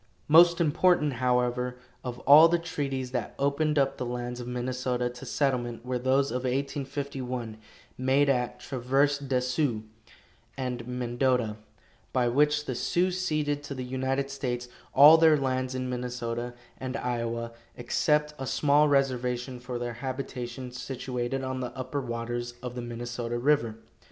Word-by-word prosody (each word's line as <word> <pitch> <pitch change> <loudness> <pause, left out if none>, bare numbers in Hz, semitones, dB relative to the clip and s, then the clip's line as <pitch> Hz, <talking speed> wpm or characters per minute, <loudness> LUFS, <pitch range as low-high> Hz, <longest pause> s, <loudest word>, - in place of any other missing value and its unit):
Most 170 +3 +7
important, 165 -1 +3
however, 125 0 0 0.3
of 125 -1 -5
all 155 +3 +9
the 175 +1 +2
treaties 135 -6 -3
that 125 -3 -3
opened 150 +2 +1
up 135 -1 +2
the - - -3
lands 120 0 -4
of 120 - -6
Minnesota 125 0 -2
to 125 - -10
settlement 125 -4 -1
were 125 0 -1
those 135 +2 +2
of 125 - 0
1851, 130 -2 -3 0.4
made 135 +2 +3
at 125 -3 0
Traverse 135 +2 +1
des 135 -3 0
Sioux 125 -3 0 0.7
and 125 -2 -4
Mendota, 125 -2 0 0.6
by 125 -1 +2
which 150 +4 +2
the 130 - -2
Sioux 175 +9 +1
ceded 155 -5 -1
to 145 -1 -7
the 130 -1 -5
United 130 +2 -1
States 125 -3 -3 0.3
all 150 +4 +9
their 160 -2 +6
lands 130 -1 -1
in 130 0 -2
Minnesota 120 -1 -4 0.2
and 130 +1 -4
Iowa, 115 -1 -2 0.3
except 150 +5 +1
a 135 - -4
small 150 +2 +3
reservation 125 -2 0
for 125 0 -5
their 120 0 -3
habitation, 125 0 -5
situated 125 0 -4
on 130 0 -3
the 125 +1 -5
upper 130 +2 -3
waters 120 0 -4
of 125 -1 -4
the 125 - -5
Minnesota 120 0 -4
river. 120 -4 +2
130 Hz, 145 wpm, -28 LUFS, 120-140 Hz, 0.7 s, all